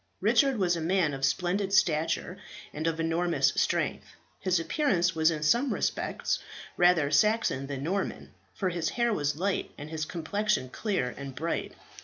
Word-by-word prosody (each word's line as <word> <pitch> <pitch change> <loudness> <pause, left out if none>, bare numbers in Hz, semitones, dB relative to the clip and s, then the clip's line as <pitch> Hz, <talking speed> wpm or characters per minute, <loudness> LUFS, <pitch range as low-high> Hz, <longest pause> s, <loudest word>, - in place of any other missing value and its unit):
Richard 275 -4 +3
was 180 -3 +2
a 165 - -3
man 170 -2 +1
of 135 0 -6
splendid 185 +6 0
stature 165 -5 +1 0.4
and 155 +2 -2
of 165 0 -1
enormous 165 +1 +2
strength. - - -1 0.2
His 185 -2 +1
appearance 180 - +1
was 160 0 +3
in 155 -2 -2
some 240 - +3
respects - - -1 0.4
rather 175 -5 +4
Saxon 155 -5 +2
than 135 -1 -5
Norman, 190 +5 -3 0.2
for 190 - -1
his 170 -3 -1
hair 235 -1 +2
was 145 -6 0
light 195 +3 -1
and 150 +2 -8
his 155 -1 -2
complexion 180 -2 -1
clear 195 - -1
and 135 -1 -8
bright. 165 +5 -3
170 Hz, 160 wpm, -28 LUFS, 155-195 Hz, 0.4 s, rather